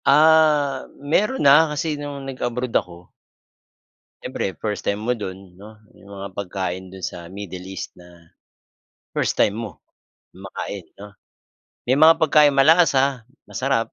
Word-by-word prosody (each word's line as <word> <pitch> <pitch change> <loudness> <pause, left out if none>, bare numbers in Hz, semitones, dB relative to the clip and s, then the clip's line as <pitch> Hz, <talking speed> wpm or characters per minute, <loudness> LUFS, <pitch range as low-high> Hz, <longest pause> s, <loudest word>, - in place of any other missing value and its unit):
Ah, 150 -2 +4
meron 205 - 0
na, 150 +3 +7
kasi 150 +1 -2
nung 145 -2 -6
nag-abroad 125 -2 -4
ako 85 0 -3 1.1
siyempre 95 - -4
first 105 -2 -3
time 100 +1 -1
mo 125 +2 -1
do'n, 95 -3 -9
'no. 105 +2 -14 0.2
'Yong 100 0 -15
mga 100 +1 -6
pagkain 95 -1 -4
do'n 95 - -10
sa 85 -1 -6
Middle 95 0 -8
East 95 -1 -8
na 85 -2 -18 0.9
first - - -1
time 100 - +3
mo 110 -3 -7 0.5
makain, 95 0 -8
'no. 100 0 -13 0.7
May 130 +2 +2
mga 160 +2 +8
pagkaing 150 -2 +5
malasa, 160 +1 +5
ah, 135 +1 +2 0.3
masarap. 130 -3 -1
115 Hz, 140 wpm, -22 LUFS, 95-145 Hz, 1.1 s, mga